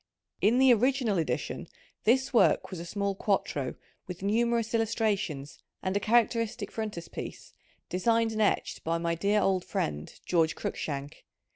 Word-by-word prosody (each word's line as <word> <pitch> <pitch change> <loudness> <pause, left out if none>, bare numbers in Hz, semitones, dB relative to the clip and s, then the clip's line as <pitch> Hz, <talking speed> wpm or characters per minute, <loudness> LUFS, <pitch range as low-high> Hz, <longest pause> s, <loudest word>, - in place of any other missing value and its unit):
In 225 +4 +4
the 260 -1 +7
original 240 -4 +2
edition 160 - -2 0.4
this 260 +4 +3
work 235 - +4
was 185 - -5
a 170 - -7
small 200 +2 -1
quarto 190 -9 -1 0.3
with 180 0 -7
numerous 230 +2 +1
illustrations 205 -11 -1 0.2
and 185 +1 -1
a - - +3
characteristic 230 0 +1
frontispiece, 210 -7 -6 0.3
designed 225 +4 +2
and 220 0 -1
etched 210 - 0
by 165 +1 0
my 170 0 -1
dear 200 +5 +2
old 190 -2 +2
friend 75 0 -3
George 165 -3 +2
Cruikshank. 145 +1 -5
205 Hz, 140 wpm, -29 LUFS, 170-230 Hz, 0.4 s, the